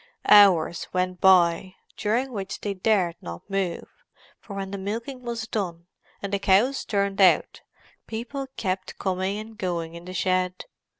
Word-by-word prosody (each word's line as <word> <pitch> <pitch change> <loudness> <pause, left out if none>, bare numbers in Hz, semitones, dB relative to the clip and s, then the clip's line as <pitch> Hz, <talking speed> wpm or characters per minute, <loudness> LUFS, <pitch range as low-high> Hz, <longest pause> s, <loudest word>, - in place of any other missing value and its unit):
Hours 190 -5 +6
went 185 0 -1
by, 185 0 +4 0.2
during 235 +5 0
which 195 -2 -5
they 205 - -2
dared 185 -3 +1
not 85 0 -8
move, 195 -3 -2 0.5
for 200 - -10
when 195 -1 -4
the 200 - -4
milking 230 +7 -5
was 235 -2 -4
done, 175 -6 -4 0.4
and 200 0 -4
the 200 - +1
cows 210 +8 +3
turned 200 -1 0
out, 185 - +4 0.5
people 245 +5 -5
kept 185 -2 -3
coming 190 +1 -1
and 220 +1 -8
going 170 -3 -3
in 170 +1 -10
the 185 - -7
shed. 185 0 0
195 Hz, 155 wpm, -25 LUFS, 180-215 Hz, 0.5 s, Hours